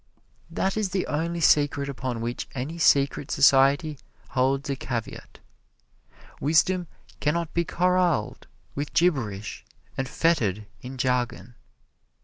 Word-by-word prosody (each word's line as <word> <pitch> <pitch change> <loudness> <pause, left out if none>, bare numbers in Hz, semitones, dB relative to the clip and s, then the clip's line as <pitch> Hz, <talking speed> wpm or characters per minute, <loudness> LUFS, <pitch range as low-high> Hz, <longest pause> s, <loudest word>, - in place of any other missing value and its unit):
That 195 +2 -1
is 210 -3 0
the 185 0 -1
only 170 +3 -2
secret 145 -2 +3
upon 130 -4 -4
which 120 +1 -4
any 145 +7 -4
secret 140 -2 +3
society 140 +2 +4 0.3
holds 135 +2 0
a 140 - -1
caveat. 120 -4 -6 1.0
Wisdom 170 +4 +2 0.3
can 150 +2 +1
not 170 -2 -3
be 170 - +1
corraled 180 -9 0 0.3
with 145 +1 -4
gibberish 120 - 0 0.3
and 135 -1 -3
fettered 110 - +1 0.2
in 130 +1 -8
jargon. 125 -4 -1
140 Hz, 120 wpm, -25 LUFS, 125-170 Hz, 1.0 s, society